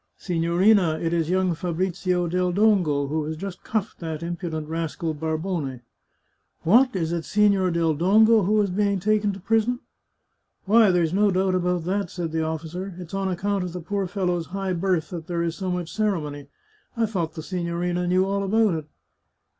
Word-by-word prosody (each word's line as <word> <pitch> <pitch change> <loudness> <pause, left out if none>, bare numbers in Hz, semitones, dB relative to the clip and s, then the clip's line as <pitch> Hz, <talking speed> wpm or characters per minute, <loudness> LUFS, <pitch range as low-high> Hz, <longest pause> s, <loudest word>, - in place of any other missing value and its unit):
" - - -46
Signorina, 175 +1 +3
it 165 0 -1
is 165 -2 0
young 185 -1 +2
Fabrizio 180 +1 -1
del 180 +1 0
Dongo, 180 -8 +3
who 155 +2 -1
has 155 +1 -4
just 190 +1 -7
cuffed 215 -2 -3
that 160 -1 -5
impudent 170 -3 -4
rascal 165 0 -3
Barbone." 155 -3 -3 0.4
" - - -47
What! 245 +8 +4
is 165 -2 -1
it 170 -1 -2
Signor 200 -2 +3
del 165 -2 +1
Dongo 215 +8 +5
who 215 +1 +3
is 200 - -2
being 200 +1 +1
taken 210 +1 +1
to 195 - -8
prison? 225 +5 +1 0.3
" - - -50
" - - -48
Why, 220 +1 +5
there's 175 -2 +2
no 205 +2 +3
doubt 190 0 +1
about 180 -1 0
that," 195 +1 -1
said 175 -3 -4
the 160 0 -1
officer. 165 +4 -4
" - - -15
It's 180 0 -9
on 195 0 -1
account 195 +1 -1
of 180 -2 -5
the 180 - -4
poor 195 +3 -2
fellow's 180 -3 -1
high 195 0 -3
birth 180 -2 0
that 165 -3 -6
there 170 -1 -1
is 165 -1 -2
so 190 -2 -4
much 180 -2 -3
ceremony. 150 -10 -2 0.5
I 230 - +3
thought 180 -7 -3
the 160 - -6
signorina 175 0 -2
knew 185 +1 +3
all 200 +1 -1
about 210 0 +2
it." 160 -2 -4
180 Hz, 195 wpm, -24 LUFS, 165-195 Hz, 0.5 s, Dongo